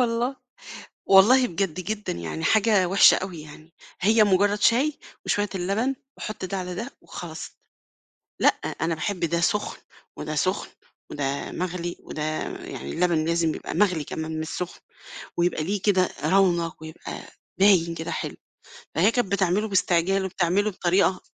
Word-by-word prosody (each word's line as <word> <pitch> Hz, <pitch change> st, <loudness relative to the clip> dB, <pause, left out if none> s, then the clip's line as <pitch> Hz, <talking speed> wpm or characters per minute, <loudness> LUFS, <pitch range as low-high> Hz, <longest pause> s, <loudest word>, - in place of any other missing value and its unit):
والله، 240 Hz, +2 st, 0 dB, 0.7 s
والله 240 Hz, +7 st, +7 dB
بجد 185 Hz, -1 st, -2 dB
جدًا 210 Hz, +3 st, -3 dB
يعني 80 Hz, -2 st, -5 dB
حاجة 210 Hz, -3 st, +4 dB
وِحشة 195 Hz, +2 st, +7 dB
أوي 180 Hz, -4 st, -5 dB
يعني، 155 Hz, +2 st, -14 dB, 0.3 s
هي 215 Hz, +3 st, +5 dB
مجرّد 205 Hz, +1 st, +2 dB
شاي 270 Hz, +8 st, +3 dB, 0.3 s
وشوية 205 Hz, 0 st, +1 dB
اللبن 200 Hz, +8 st, 0 dB, 0.2 s
وحط 215 Hz, -2 st, -6 dB
ده 190 Hz, +1 st, -3 dB
على 180 Hz, -1 st, -4 dB
ده 235 Hz, +8 st, -5 dB
وخلاص، 165 Hz, -2 st, -8 dB, 0.9 s
لأ -, -, +6 dB, 0.3 s
أنا 165 Hz, +1 st, +1 dB
باحب 185 Hz, +3 st, -3 dB
ده 170 Hz, 0 st, 0 dB
سُخن 210 Hz, +4 st, 0 dB, 0.4 s
وده 150 Hz, 0 st, -4 dB
سُخن 185 Hz, +7 st, 0 dB, 0.4 s
وده 140 Hz, -1 st, -3 dB
مغلي 175 Hz, -1 st, -3 dB
وده 155 Hz, -, -6 dB, 0.4 s
يعني 70 Hz, +1 st, -7 dB
اللبن 170 Hz, -, +1 dB
لازم 165 Hz, -1 st, +1 dB
يبقى -, -, -6 dB
مغلي 180 Hz, -5 st, +2 dB
كمان 160 Hz, +1 st, -4 dB
مش 160 Hz, -, -4 dB
سُخن، 180 Hz, +1 st, -5 dB, 0.6 s
ويبقى 170 Hz, -2 st, +1 dB
ليه 200 Hz, +3 st, -2 dB
كده 190 Hz, -3 st, +3 dB, 0.2 s
رونق 170 Hz, -1 st, +2 dB
ويبقى 160 Hz, +1 st, -8 dB, 0.4 s
باين 185 Hz, -4 st, +4 dB
كده 165 Hz, 0 st, -5 dB
حلو، -, -, -4 dB, 0.6 s
فهي 190 Hz, +7 st, +4 dB
كانت 230 Hz, -5 st, -1 dB
بتعمله 200 Hz, +2 st, +1 dB
باستعجال 190 Hz, 0 st, +2 dB
وبتعمله 190 Hz, +3 st, +1 dB
بطريقة 185 Hz, 0 st, +1 dB
185 Hz, 145 wpm, -25 LUFS, 165-205 Hz, 0.9 s, والله